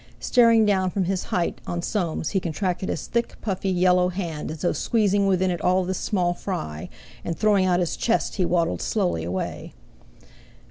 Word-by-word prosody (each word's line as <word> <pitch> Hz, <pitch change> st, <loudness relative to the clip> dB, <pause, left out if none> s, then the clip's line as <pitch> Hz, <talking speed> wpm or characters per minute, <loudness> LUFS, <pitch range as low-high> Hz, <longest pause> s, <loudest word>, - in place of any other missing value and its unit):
Staring 230 Hz, -3 st, +4 dB
down 190 Hz, -3 st, +2 dB
from 190 Hz, +1 st, -1 dB
his 185 Hz, +1 st, -2 dB
height 175 Hz, -1 st, -2 dB
on 175 Hz, 0 st, -3 dB
Soames 175 Hz, -7 st, -1 dB
he 195 Hz, -, +1 dB
contracted 185 Hz, +2 st, -2 dB
his -, -, -3 dB
thick, 235 Hz, 0 st, -2 dB
puffy, 195 Hz, -2 st, -2 dB
yellow 180 Hz, 0 st, +3 dB
hand 170 Hz, -5 st, -4 dB
as 155 Hz, 0 st, -7 dB
though 175 Hz, -, +2 dB
squeezing 205 Hz, -3 st, +1 dB
within 185 Hz, -1 st, +2 dB
it 175 Hz, -, -3 dB
all 185 Hz, 0 st, +2 dB
this 185 Hz, 0 st, -2 dB
small 180 Hz, -4 st, 0 dB
fry, 80 Hz, -, -5 dB, 0.3 s
and 165 Hz, -, -3 dB
throwing 205 Hz, -3 st, +3 dB
out 180 Hz, -1 st, +2 dB
his 175 Hz, -2 st, -1 dB
chest 230 Hz, -2 st, 0 dB
he 190 Hz, -, +2 dB
waddled 170 Hz, -1 st, 0 dB
slowly 180 Hz, -, 0 dB
away. 90 Hz, +3 st, -4 dB
185 Hz, 180 wpm, -24 LUFS, 175-200 Hz, 0.3 s, Staring